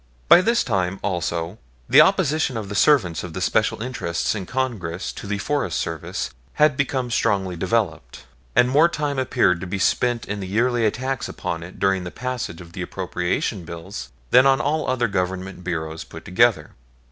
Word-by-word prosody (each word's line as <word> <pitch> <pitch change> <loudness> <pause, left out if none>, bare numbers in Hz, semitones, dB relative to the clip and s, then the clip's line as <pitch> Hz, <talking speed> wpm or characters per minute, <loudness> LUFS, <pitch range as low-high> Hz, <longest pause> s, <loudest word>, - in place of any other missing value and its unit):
By 175 - +8
this 235 +4 +2
time, 95 -4 -1
also, 85 0 -2 0.3
the - - +8
opposition 145 -4 +2
of 105 -3 -5
the - - -4
servants 100 - +3
of 90 -3 -7
the 95 - -4
special 110 +3 +1
interests 115 -10 -2
in 100 -4 -5
Congress 110 -10 -3
to - - -8
the 100 0 -1
Forest 100 -3 -1
Service 80 -2 -4 0.2
had 150 -2 +4
become 130 -2 -1
strongly 95 -5 +1
developed, 85 - -2 0.3
and 125 - +5
more 150 +6 +5
time 145 -4 -2
appeared 120 -9 +2
to 95 - -5
be 100 - -3
spent 120 +4 +1
in 105 0 -3
the 95 - -5
yearly 115 +3 +2
attacks 130 +4 -2
upon 85 - -4
it 90 +2 -10
during 95 -1 +1
the 90 - -5
passage 125 -7 -5
of 85 -1 -13
the 90 - -6
appropriation 90 +1 -2
bills 85 -5 -7 0.2
than 130 +2 +7
on 135 -1 +4
all 150 +6 0
other 125 -2 +1
Government 95 -1 -3
Bureaus 80 -2 -4
put - - -12
together. 115 +4 +2
100 Hz, 180 wpm, -22 LUFS, 90-125 Hz, 0.3 s, By